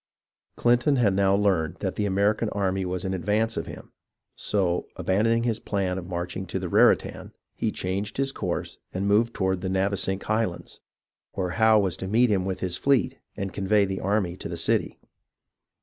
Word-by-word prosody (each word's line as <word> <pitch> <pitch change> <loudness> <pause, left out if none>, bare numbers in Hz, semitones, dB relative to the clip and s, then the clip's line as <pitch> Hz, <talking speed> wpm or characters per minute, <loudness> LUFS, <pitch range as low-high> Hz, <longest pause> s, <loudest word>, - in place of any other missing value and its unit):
Clinton 120 +4 +3
had 115 -7 +3
now 95 0 +3
learned 95 -6 +1
that - - -3
the 105 - -1
American 100 +3 +1
army 95 -2 -1
was 90 +1 -3
in 95 - -1
advance 105 +5 0
of - - -3
him; - - -10 0.4
so, 90 -4 0
abandoning 115 +5 +1
his 115 -2 0
plan 95 -4 -1
of 90 - -9
marching 90 +1 -4
to - - -3
the - - -3
Raritan, - - +2 0.2
he - - -1
changed 95 +3 -3
his 135 0 +1
course - - -4
and 95 +2 -2
moved 115 +3 +2
toward 95 -2 0
the 95 - -2
Navesink 95 0 0
Highlands, 110 -5 -2 0.5
where 90 -2 -2
Howe 110 +2 +4
was 95 -5 +1
to 95 - -5
meet 115 +4 +3
him 95 -2 +1
with 95 -1 -3
his 90 -1 -1
fleet 135 -1 +1 0.2
and 95 -2 -4
convey 100 +1 +2
the 95 -1 -3
army 95 -3 0
to - - -6
the - - -4
city. - - 0
100 Hz, 180 wpm, -26 LUFS, 95-110 Hz, 0.5 s, Howe